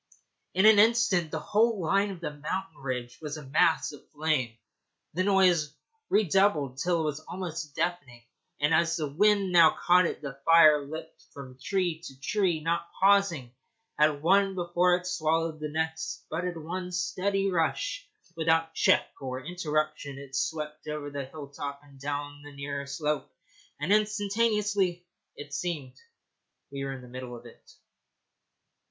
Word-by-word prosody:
In 190 Hz, +3 st, +4 dB
an 215 Hz, -1 st, +8 dB
instant 220 Hz, -6 st, +4 dB
the 160 Hz, -, -3 dB
whole 220 Hz, +4 st, +2 dB
line 195 Hz, +4 st, +1 dB
of 185 Hz, -3 st, -8 dB
the 160 Hz, -, -3 dB
mountain 165 Hz, +3 st, -5 dB
ridge 125 Hz, -3 st, -5 dB
was 150 Hz, 0 st, -5 dB
a 150 Hz, -, -9 dB
mass 155 Hz, +4 st, +2 dB
of 145 Hz, -, -12 dB
flame, 145 Hz, -7 st, -1 dB, 0.6 s
the 185 Hz, +4 st, 0 dB
noise 180 Hz, -6 st, +3 dB, 0.3 s
redoubled 190 Hz, -9 st, +2 dB
till 170 Hz, +1 st, +1 dB
it -, -, -1 dB
was 150 Hz, -1 st, -2 dB
almost 165 Hz, -3 st, -6 dB
deafening, 155 Hz, -8 st, -3 dB, 0.4 s
and, 150 Hz, +2 st, +2 dB
as 170 Hz, +1 st, +3 dB
the 155 Hz, -3 st, -2 dB
wind 200 Hz, +5 st, +2 dB
now 170 Hz, -3 st, +6 dB
caught 180 Hz, 0 st, +5 dB
it, -, -, -6 dB
the 135 Hz, -1 st, -7 dB
fire 155 Hz, -3 st, +6 dB
leaped 160 Hz, +2 st, -8 dB
from 130 Hz, -2 st, -9 dB
tree 180 Hz, -5 st, 0 dB
to 135 Hz, -6 st, -11 dB
tree, 175 Hz, +1 st, 0 dB
not 170 Hz, +1 st, -1 dB
pausing 190 Hz, -10 st, +3 dB, 0.5 s
at 150 Hz, -1 st, +3 dB
one 195 Hz, +2 st, +3 dB
before 175 Hz, 0 st, +2 dB
it 180 Hz, 0 st, -5 dB
swallowed 165 Hz, -2 st, 0 dB
the 150 Hz, 0 st, -4 dB
next, 160 Hz, +1 st, -3 dB
but 165 Hz, +3 st, -2 dB
in 170 Hz, -3 st, -4 dB
one 180 Hz, +2 st, -5 dB
steady 190 Hz, +2 st, 0 dB
rush, -, -, -1 dB, 0.3 s
without 165 Hz, 0 st, +1 dB
check -, -, +3 dB, 0.2 s
or 130 Hz, 0 st, -5 dB
interruption, 155 Hz, -4 st, -2 dB
it 135 Hz, -1 st, -9 dB
swept 150 Hz, +2 st, -3 dB
over 150 Hz, -1 st, -4 dB
the 140 Hz, -1 st, -4 dB
hill 140 Hz, +1 st, -9 dB
top 140 Hz, 0 st, -6 dB
and 140 Hz, -2 st, -18 dB
down 145 Hz, +1 st, -4 dB
the 145 Hz, 0 st, -11 dB
nearer 140 Hz, 0 st, -5 dB
slope, 150 Hz, +1 st, -2 dB, 0.5 s
and 160 Hz, +8 st, +1 dB
instantaneously, 210 Hz, -3 st, +1 dB, 0.3 s
as 145 Hz, -, -7 dB
it -, -, -13 dB
seemed, 150 Hz, -7 st, -3 dB, 0.8 s
we 140 Hz, 0 st, -5 dB
were 135 Hz, 0 st, -3 dB
in 130 Hz, -2 st, -9 dB
the -, -, -12 dB
middle 125 Hz, 0 st, -7 dB
of 120 Hz, 0 st, -12 dB
it. 120 Hz, -, -16 dB
160 Hz, 160 wpm, -28 LUFS, 145-180 Hz, 0.8 s, an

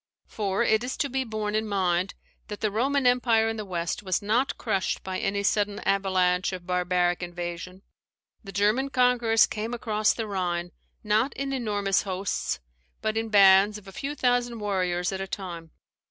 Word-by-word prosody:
For 200 Hz, 0 st, -1 dB
it 220 Hz, 0 st, +2 dB
is 250 Hz, -, -4 dB
to 280 Hz, -, 0 dB
be 265 Hz, 0 st, 0 dB
borne 215 Hz, -3 st, -3 dB
in 215 Hz, 0 st, 0 dB
mind, 185 Hz, -2 st, 0 dB, 0.3 s
that 210 Hz, -1 st, -7 dB
the 215 Hz, -, +1 dB
Roman 265 Hz, +5 st, +1 dB
empire 240 Hz, -3 st, +3 dB
in 225 Hz, 0 st, -2 dB
the 215 Hz, -, -4 dB
West 175 Hz, -3 st, -3 dB
was 185 Hz, -3 st, 0 dB
not 230 Hz, +7 st, 0 dB
crushed 200 Hz, -5 st, -1 dB
by 185 Hz, 0 st, -3 dB
any 200 Hz, 0 st, -1 dB
sudden 205 Hz, 0 st, +1 dB
avalanche 185 Hz, -2 st, +1 dB
of 180 Hz, -1 st, -7 dB
barbaric 180 Hz, -1 st, +1 dB
invasion. 175 Hz, +1 st, -6 dB, 0.6 s
The 195 Hz, -, -8 dB
German 210 Hz, +8 st, +1 dB
conquerors 245 Hz, -4 st, +4 dB
came 220 Hz, +3 st, -4 dB
across 215 Hz, -2 st, +1 dB
the 225 Hz, -, -3 dB
Rhine, 175 Hz, -3 st, -2 dB, 0.3 s
not 215 Hz, +5 st, +1 dB
in 275 Hz, 0 st, -3 dB
enormous 205 Hz, -6 st, 0 dB
hosts, 190 Hz, -, -2 dB, 0.4 s
but 215 Hz, 0 st, 0 dB
in 225 Hz, 0 st, -1 dB
bands 200 Hz, 0 st, +6 dB
of 210 Hz, -1 st, -14 dB
a -, -, -9 dB
few 275 Hz, +9 st, -5 dB
thousand 245 Hz, -3 st, +1 dB
warriors 185 Hz, -3 st, -1 dB
at 190 Hz, 0 st, -4 dB
a 195 Hz, -, -4 dB
time. 175 Hz, -4 st, -6 dB
205 Hz, 175 wpm, -26 LUFS, 185-225 Hz, 0.6 s, bands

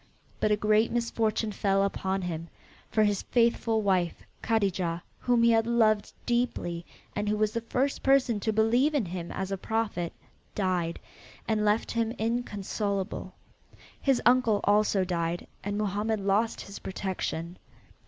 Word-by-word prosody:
But -, -, +2 dB
a 210 Hz, -, +4 dB
great 215 Hz, +2 st, +3 dB
misfortune 225 Hz, -2 st, 0 dB
fell 195 Hz, -1 st, +1 dB
upon 195 Hz, -1 st, -1 dB
him, 165 Hz, -2 st, -4 dB, 0.4 s
for 215 Hz, -, +3 dB
his 205 Hz, -2 st, +1 dB
faithful 230 Hz, -2 st, +2 dB
wife 185 Hz, -3 st, +1 dB, 0.2 s
Kadijah, 185 Hz, -6 st, 0 dB, 0.2 s
whom 245 Hz, -2 st, +2 dB
he 235 Hz, -, +6 dB
had 225 Hz, 0 st, +3 dB
loved 220 Hz, -3 st, +3 dB
deeply, 235 Hz, -8 st, -1 dB, 0.3 s
and 205 Hz, 0 st, -1 dB
who 210 Hz, -, +1 dB
was 215 Hz, 0 st, +2 dB
the 230 Hz, -, -2 dB
first 255 Hz, +4 st, -1 dB
person 270 Hz, -5 st, +3 dB
to 220 Hz, -, 0 dB
believe 235 Hz, +8 st, +3 dB
in 260 Hz, -8 st, +2 dB
him 175 Hz, -1 st, -5 dB
as 190 Hz, 0 st, -4 dB
a 195 Hz, -, -1 dB
prophet, 205 Hz, -5 st, -2 dB, 0.4 s
died, 180 Hz, -4 st, 0 dB, 0.5 s
and 215 Hz, -1 st, +1 dB
left 210 Hz, +1 st, +1 dB
him 230 Hz, 0 st, 0 dB
inconsolable. 210 Hz, -3 st, -2 dB, 0.7 s
His 270 Hz, -3 st, +3 dB
uncle 240 Hz, -4 st, +4 dB
also 205 Hz, -2 st, +3 dB
died, 170 Hz, -1 st, -2 dB, 0.2 s
and 205 Hz, 0 st, -2 dB
Mohammed 210 Hz, +1 st, 0 dB
lost 200 Hz, +3 st, +1 dB
his 200 Hz, -, -9 dB
protection. 185 Hz, -3 st, -4 dB
210 Hz, 145 wpm, -28 LUFS, 190-230 Hz, 0.7 s, he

